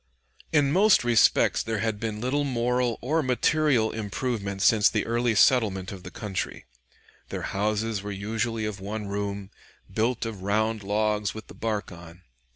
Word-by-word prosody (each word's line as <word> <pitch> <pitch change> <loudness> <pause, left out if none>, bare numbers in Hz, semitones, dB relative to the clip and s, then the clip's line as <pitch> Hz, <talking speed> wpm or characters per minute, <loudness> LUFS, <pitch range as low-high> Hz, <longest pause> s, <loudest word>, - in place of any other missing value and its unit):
In 145 -3 +3
most 200 +2 +5
respects 120 -2 +4
there 110 -1 -2
had 110 -1 -1
been 110 -1 -3
little 135 +4 0
moral 125 -2 0
or 155 +6 +1
material 130 -2 +2
improvement 105 -2 -3
since 105 -3 +5
the 110 - -1
early 120 0 +1
settlement 100 -5 +3
of 95 -2 -8
the - - -9
country. 100 -3 -5 0.6
Their - - -5
houses 105 +1 -1
were 100 - -6
usually 110 +3 -2
of 105 -2 -4
one 105 +2 -5
room, 100 0 -4 0.4
built 115 +2 0
of 110 -4 -6
round 110 +2 0
logs 105 +1 0
with 110 - -8
the - - -13
bark 110 -3 -3
on. 85 +1 -13
110 Hz, 160 wpm, -26 LUFS, 100-120 Hz, 0.6 s, most